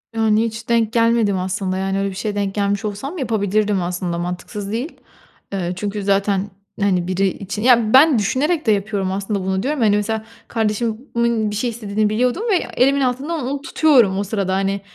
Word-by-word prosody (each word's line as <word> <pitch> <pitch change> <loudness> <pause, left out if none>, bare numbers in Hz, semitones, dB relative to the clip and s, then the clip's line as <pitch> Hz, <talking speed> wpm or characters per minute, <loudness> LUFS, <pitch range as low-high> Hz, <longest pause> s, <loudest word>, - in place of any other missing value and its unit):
Yani, 220 0 +2
hiç 225 +1 -6
denk 230 -1 +2
gelmedim 230 -4 +2
aslında. 185 0 -2
Yani, 195 +1 -1
öyle 200 0 0
bir 190 - -8
şeye 205 +1 -3
denk 200 -1 -2
gelmiş 200 0 0
olsam 270 - -5
yapabilirdim 210 - 0
aslında 175 0 -3
mantıksız 180 +4 -5
değil. 250 +9 -3 0.6
Eee, 180 -2 -2
çünkü 205 +2 -4
zaten, 200 0 +1 0.3
hani, 185 -3 +1
biri 190 +1 +1
için 200 +2 -5
Ya, 235 -3 +4
ben 270 -2 +7
düşünerek 300 - 0
de 220 - +4
yapıyorum 200 -2 -1
aslında 200 +1 -2
bunu 190 0 -1
diyorum. 295 +2 -1
Hani, 210 -2 +4
mesela 220 +1 -1 0.2
kardeşimin 225 0 -1
bir - - -4
şey 240 +4 -1
istediğini 215 -2 -1
biliyordum 250 - 0
ve - - +4 0.2
elimin 275 +2 +3
altından 270 +3 -1
onu 280 +1 -3
tutuyorum, 265 -11 +3
o 200 - 0
sırada, 195 -2 -2
hani. 195 +1 -1
210 Hz, 180 wpm, -20 LUFS, 195-235 Hz, 0.6 s, ben